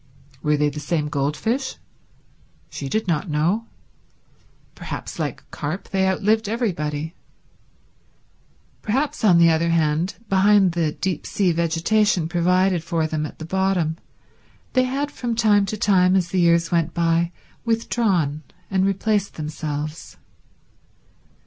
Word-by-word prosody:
Were 150 0 +2
they 150 0 +2
the 150 +1 -6
same 150 -1 -1
goldfish? 150 - -1 1.0
She 140 - -5
did 220 +4 -1
not 165 0 -1
know. 170 +10 0 1.1
Perhaps, - - -7
like - - -3
carp, 155 +6 -5
they 190 -1 +1
outlived 210 +3 +1
everybody. 160 -9 -2 1.7
Perhaps, 265 +7 -1
on 185 -6 +6
the 170 -1 +6
other 165 +1 +1
hand, 165 +2 +1
behind 195 -1 +4
the 165 -3 0
deep 185 -5 -3
sea 190 -3 +1
vegetation 170 +2 +1
provided 180 +1 +2
for 165 -2 -1
them 155 -1 -2
at - - -13
the 160 - -7
bottom, 185 -3 0 0.8
they 255 -1 +3
had 280 +3 -2
from 240 -2 -3
time 210 -3 +3
to 215 - -3
time 185 -3 +3
as 180 -3 +1
the 185 - 0
years 170 -1 +3
went 170 -1 0
by 170 0 +1 0.3
withdrawn 205 -10 0 0.3
and 190 0 +2
replaced 200 +1 0
themselves. 150 0 -5
175 Hz, 130 wpm, -22 LUFS, 160-205 Hz, 1.7 s, on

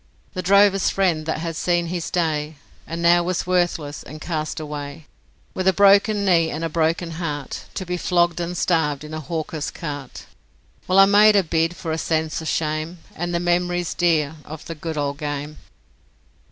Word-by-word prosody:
The 185 - -3
drover's 195 +1 +4
friend 170 -5 0
that 160 - -1
had 165 +1 -4
seen 175 +1 +1
his 170 0 -3
day, 155 -3 -1 0.3
And 165 +1 -4
now 175 +1 +5
was 180 +1 -2
worthless, 175 -5 0
and 155 - -10
cast 155 -1 -3
away 150 0 -7 0.5
With 185 0 -2
a 190 - +5
broken 200 +1 +4
knee 170 -4 +3
and 160 +2 -4
a 165 - -1
broken 165 +1 0
heart 145 -4 -4
To 190 - -4
be 180 0 -2
flogged 175 -1 +1
and 175 +1 -3
starved 150 -5 +1
in 155 +1 -9
a 155 - -3
hawker's 155 0 -4
cart. 145 -6 -7 0.6
Well, 185 - +2
I 195 - +9
made 210 +2 +6
a 200 - +5
bid 165 +1 0
for 165 -2 -5
a 160 - -1
sense 160 0 -1
of 160 - -6
shame 155 +2 -2 0.2
And 175 +1 -3
the 170 - 0
memories 175 0 0
dear 160 -3 +1
of 155 0 -9
the 165 - -5
good 160 0 -5
old 145 -1 -2
game. 145 0 -4
165 Hz, 185 wpm, -22 LUFS, 155-180 Hz, 0.6 s, I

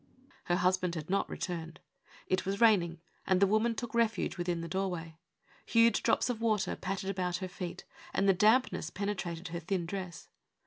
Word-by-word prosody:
Her 175 - +2
husband 180 -1 +1
had 160 +2 -5
not 200 - +1
returned. 165 -2 -5 0.5
It 185 -1 0
was 195 +1 -2
raining, 175 -8 +4 0.3
and 190 -1 +3
the 200 - +6
woman 215 +3 +2
took 240 -3 -5
refuge 230 -1 +1
within 175 -2 -2
the 170 - -5
doorway. 170 -3 -3 0.4
Huge 230 0 +4
drops - - +2
of 240 -3 -2
water 215 -3 +1
pattered 195 0 -3
about 180 -2 -1
her 185 +1 -4
feet, 180 -1 -6 0.3
and 195 - +1
the 195 - +6
damp 220 +7 +4
ness 160 - -4
penetrated 180 -4 -4
her 170 +1 -4
thin 175 +1 -2
dress. 185 -2 -6
185 Hz, 180 wpm, -31 LUFS, 175-205 Hz, 0.5 s, the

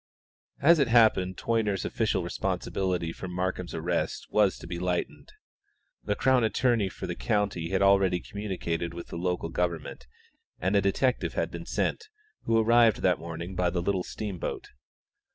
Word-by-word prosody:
As 165 +4 +6
it 140 - +3
happened 110 -6 +4
Toyner's 110 -4 0
official - - 0
responsibility 90 -4 -2
for 95 - -7
Markham's 90 0 -3
arrest 85 +1 -2
was 105 -3 +3
to - - -11
be 85 - -5
lightened. 90 -1 -3 0.7
The 105 - -1
Crown 130 0 +3
Attorney 110 -1 +2
for - - -7
the - - -3
county 85 - -1
had 95 +1 +1
already 95 -2 +4
communicated 85 -5 -4
with 85 - -8
the - - -7
local 90 -1 -2
government, 85 -6 -3 0.5
and 95 +4 0
a 100 - +5
detective 125 +7 0
had - - -1
been - - -7
sent, 445 - -1 0.4
who 115 - +2
arrived 115 0 +4
that 90 -2 +3
morning 85 +2 -6
by 90 -1 +1
the 90 0 -2
little 95 -1 0
steamboat. 100 -4 -5
95 Hz, 155 wpm, -28 LUFS, 90-105 Hz, 0.7 s, As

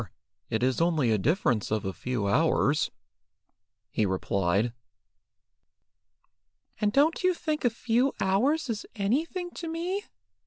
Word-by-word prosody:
It 110 +2 -1
is 130 +4 +1
only 160 -8 +2
a 110 - +2
difference 125 - +1
of 110 -2 -1
a 95 - -2
few 125 -2 -3
hours," 150 +4 +2 1.0
he 110 - +1
replied. 100 +3 0 2.1
"And 210 -1 +2
don't 300 - +3
you 365 -1 +3
think 310 -2 -2
a 245 - +4
few 235 +3 +1
hours 255 +13 +2
is 225 -3 -4
anything 320 - -1
to 340 - -7
me?" 350 +5 -3
195 Hz, 125 wpm, -28 LUFS, -, 2.1 s, a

